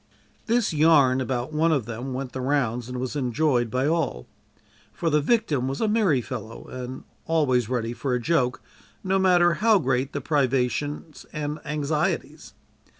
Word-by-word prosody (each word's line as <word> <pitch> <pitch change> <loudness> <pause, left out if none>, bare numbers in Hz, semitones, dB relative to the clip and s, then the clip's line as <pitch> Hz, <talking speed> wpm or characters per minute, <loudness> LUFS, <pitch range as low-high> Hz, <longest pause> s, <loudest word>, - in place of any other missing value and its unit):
This 230 -5 +1
"yarn" 145 -4 +4
about 130 +2 -3
one 160 +2 +2
of 140 -8 +1
them 120 +4 -5
went 130 0 -4
the 130 - -5
rounds 125 -3 0
and 125 0 -4
was 130 +2 -4
enjoyed 125 -2 +1
by 130 +4 0
all, 150 - -1 0.7
for 165 - -2
the 150 0 +3
"victim" 155 - +1
was 135 +1 -3
a 220 - +1
merry 210 - +2
fellow 115 -3 -7
and 130 0 -7 0.2
always 130 -8 +2
ready 120 -2 -1
for 125 +1 -2
a - - 0
joke, 130 -2 0 0.4
no 190 +1 +1
matter 175 -2 +4
how 220 +3 +4
great 135 -4 0
the 140 - -3
privations 145 +2 -1
and 150 0 -4
anxieties. 150 +4 -2
140 Hz, 160 wpm, -25 LUFS, 125-160 Hz, 0.7 s, yarn